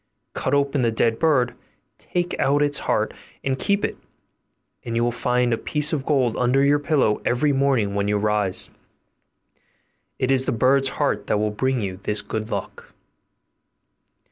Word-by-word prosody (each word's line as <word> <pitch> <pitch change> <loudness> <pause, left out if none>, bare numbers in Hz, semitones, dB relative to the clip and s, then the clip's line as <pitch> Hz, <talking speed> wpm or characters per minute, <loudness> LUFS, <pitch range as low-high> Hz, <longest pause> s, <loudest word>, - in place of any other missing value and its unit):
Cut - - 0
open 140 -1 +1
the 120 - +2
dead 115 0 +1
bird, 140 -7 +2 0.5
take 175 0 -2
out 145 +2 +3
its 145 -1 0
heart - - +1 0.3
and 135 -1 -1
keep 200 0 +1
it, - - -5 0.8
and 115 -1 -4
you 115 - +2
will 120 - +1
find 125 0 +1
a 115 - -1
piece 150 +1 -1
of 140 -4 -2
gold 130 -6 +2
under 125 +2 +2
your 145 +1 +4
pillow 140 -8 +1
every 145 +4 +1
morning 135 -7 +1
when 100 0 -1
you 105 0 +1
rise. 105 -2 +1 1.5
It 130 0 0
is 130 -1 +2
the - - 0
bird's 135 +3 +3
heart - - 0
that - - +1
will 105 0 0
bring 130 +3 -1
you 95 -2 -4
this 105 +1 -2
good 110 0 -4
luck. - - -6
125 Hz, 170 wpm, -23 LUFS, 110-140 Hz, 1.5 s, your